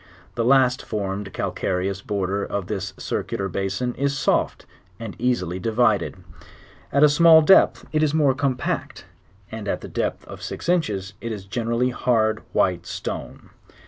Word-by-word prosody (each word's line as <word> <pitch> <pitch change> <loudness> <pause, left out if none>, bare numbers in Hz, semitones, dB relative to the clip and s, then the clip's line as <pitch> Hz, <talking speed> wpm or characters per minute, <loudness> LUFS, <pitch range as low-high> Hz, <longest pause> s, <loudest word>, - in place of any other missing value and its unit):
The 115 - -1
last 130 0 +4
formed 100 -1 -4
calcareous 95 +1 -2
border 100 0 -2
of 100 -2 -3
the 100 0 -3
circular 95 +1 -3
basin 95 +6 -2
is 140 +2 -1
soft, - - 0 0.3
and 115 -3 -7
easily 95 -8 0
divided; 110 -2 +1 0.8
at 140 +2 +4
a - - +9
small 160 +2 +7
depth 190 +5 +5
it 155 - +1
is 155 -2 +2
more 145 -3 +3
compact; 130 -2 -2 0.5
and 110 -2 -6
at - - -2
the - - -7
depth - - -3
of - - -10
six - - -6
inches 105 - 0
it 115 - -4
is 100 -3 -6
generally 115 +4 -1
hard 115 -3 +1
white 90 -1 +1
stone. - - -6
110 Hz, 150 wpm, -23 LUFS, 95-130 Hz, 0.8 s, a